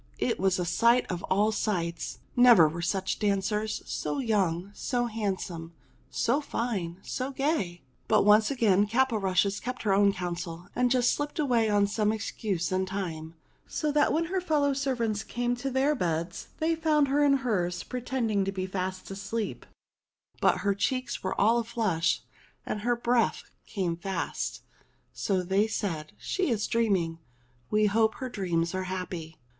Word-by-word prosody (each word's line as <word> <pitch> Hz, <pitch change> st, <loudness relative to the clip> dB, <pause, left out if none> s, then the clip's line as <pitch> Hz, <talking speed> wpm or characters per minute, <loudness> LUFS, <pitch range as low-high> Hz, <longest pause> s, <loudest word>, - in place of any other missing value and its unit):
It -, -, 0 dB
was 190 Hz, 0 st, +2 dB
a 180 Hz, -, -1 dB
sight 235 Hz, +8 st, +3 dB
of 175 Hz, -1 st, -3 dB
all 205 Hz, +3 st, +2 dB
sights! 170 Hz, -6 st, -2 dB, 0.2 s
Never 240 Hz, -10 st, +8 dB
were 165 Hz, +3 st, -4 dB
such 190 Hz, +2 st, -1 dB
dancers! 210 Hz, +1 st, 0 dB
So -, -, -3 dB
young, 200 Hz, -7 st, 0 dB
so 245 Hz, +2 st, -1 dB
handsome, 190 Hz, -7 st, -3 dB, 0.4 s
so 265 Hz, +6 st, +1 dB
fine, 200 Hz, -, -3 dB
so 255 Hz, +1 st, -3 dB
gay! 270 Hz, -, -1 dB, 0.2 s
But 215 Hz, -, +4 dB
once 210 Hz, +1 st, +6 dB
again 210 Hz, -6 st, +3 dB
Caporushes 205 Hz, -5 st, +1 dB
kept 250 Hz, 0 st, -5 dB
her 205 Hz, -3 st, +2 dB
own 200 Hz, 0 st, +5 dB
counsel 175 Hz, -2 st, -5 dB
and 250 Hz, 0 st, +2 dB
just 250 Hz, -1 st, +3 dB
slipped 290 Hz, 0 st, -3 dB
away 245 Hz, -7 st, +2 dB
on 205 Hz, -1 st, +4 dB
some 210 Hz, +1 st, +1 dB
excuse 205 Hz, -5 st, -2 dB
in 185 Hz, 0 st, 0 dB
time, 165 Hz, -4 st, -5 dB, 0.3 s
so 300 Hz, -, -1 dB
that 295 Hz, 0 st, +3 dB
when 330 Hz, +2 st, +1 dB
her 370 Hz, +2 st, -1 dB
fellow 295 Hz, -5 st, +2 dB
servants 240 Hz, -6 st, -1 dB
came 245 Hz, 0 st, -1 dB
to 270 Hz, +3 st, -3 dB
their 270 Hz, +3 st, +2 dB
beds 170 Hz, -, -2 dB
they 320 Hz, +1 st, +1 dB
found 310 Hz, -3 st, +2 dB
her 290 Hz, +2 st, +3 dB
in 285 Hz, -1 st, +5 dB
hers, 180 Hz, -6 st, 0 dB
pretending 245 Hz, -5 st, -1 dB
to 195 Hz, -, -1 dB
be 190 Hz, -1 st, -3 dB
fast 185 Hz, 0 st, -4 dB
asleep; 200 Hz, +3 st, -4 dB, 0.7 s
but -, -, +3 dB
her 200 Hz, -, +3 dB
cheeks 255 Hz, +5 st, -1 dB
were 190 Hz, -, -2 dB
all 230 Hz, +4 st, +4 dB
flushed 215 Hz, -8 st, 0 dB, 0.4 s
and 210 Hz, -, -3 dB
her 240 Hz, +2 st, +1 dB
breath 235 Hz, 0 st, +1 dB, 0.2 s
came 180 Hz, -4 st, -1 dB
fast. 190 Hz, +3 st, -3 dB, 0.5 s
So 190 Hz, -3 st, 0 dB
they 195 Hz, +4 st, +2 dB
said, 165 Hz, -8 st, -3 dB
"She 375 Hz, -5 st, -1 dB
is 220 Hz, -4 st, 0 dB
dreaming. 190 Hz, -8 st, +1 dB, 0.5 s
We 215 Hz, 0 st, +3 dB
hope 220 Hz, +1 st, +2 dB
her 260 Hz, -, -5 dB
dreams 170 Hz, -6 st, -1 dB
are 185 Hz, 0 st, -2 dB
happy." 180 Hz, -3 st, -5 dB
210 Hz, 160 wpm, -28 LUFS, 185-245 Hz, 0.7 s, Never